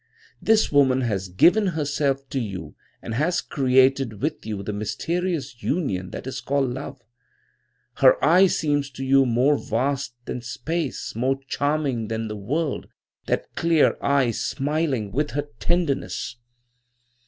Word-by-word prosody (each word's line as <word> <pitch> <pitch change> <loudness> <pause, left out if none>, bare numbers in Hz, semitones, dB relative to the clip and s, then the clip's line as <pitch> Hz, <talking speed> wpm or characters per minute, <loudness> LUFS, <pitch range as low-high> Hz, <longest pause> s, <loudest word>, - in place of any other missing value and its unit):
This 220 0 +3
woman 130 -3 +4
has 100 -6 -2
given 180 - +4
herself 145 -4 -1
to 135 - -1
you 90 - -5 0.3
and 115 - -5
has 155 +9 +1
created 130 -4 +2
with 145 -3 -3
you 105 -2 -4
the 105 - -4
mysterious 135 - -3
union 100 - -1
that - - -7
is 130 0 -5
called 135 -2 0
Love. 130 0 -7 0.9
Her - - +6
eye 180 +5 +6
seems 145 -5 0
to 135 +2 -5
you 135 0 +4
more 125 +5 +3
vast 130 +2 -1
than 125 - -4
space, 145 +4 -4
more 130 +4 0
charming 145 -7 -1
than 110 0 -3
the 105 - -4
world, 140 +9 -2 0.4
that - - -2
clear 165 -2 +3
eye 140 -4 +2
smiling 140 -4 -1
with 145 +6 0
her 145 0 -2
tenderness. 165 -7 -1
135 Hz, 140 wpm, -24 LUFS, 120-150 Hz, 0.9 s, Her